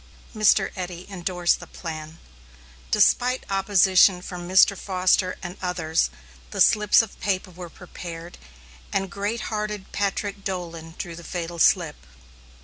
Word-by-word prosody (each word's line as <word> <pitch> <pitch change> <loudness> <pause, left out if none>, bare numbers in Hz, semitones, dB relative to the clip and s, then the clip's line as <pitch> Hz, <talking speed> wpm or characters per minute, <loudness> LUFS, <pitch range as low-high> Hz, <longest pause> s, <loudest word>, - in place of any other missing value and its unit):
Mr. 210 -2 +4
Eddy 180 -1 -6
endorsed 180 -2 0
the - - -10
plan. 160 -1 -7 0.7
Despite 250 - +3
opposition 190 -1 +4
from 175 -1 -7
Mr. 190 +2 +6
Foster 185 -1 +1
and 175 0 -6
others, 165 - 0 0.4
the - - -6
slips 210 +1 +5
of 220 - -10
paper 185 -1 -2
were 175 0 -9
prepared, 170 -1 -9 0.5
and 195 -1 -1
great 205 +4 -3
hearted 210 -2 -4
Patrick 200 0 -2
Dolan 170 -4 -5
drew 170 -2 -6
the 170 - -10
fatal 170 -1 -5
slip. 150 - +3
185 Hz, 130 wpm, -24 LUFS, 175-200 Hz, 0.7 s, Mr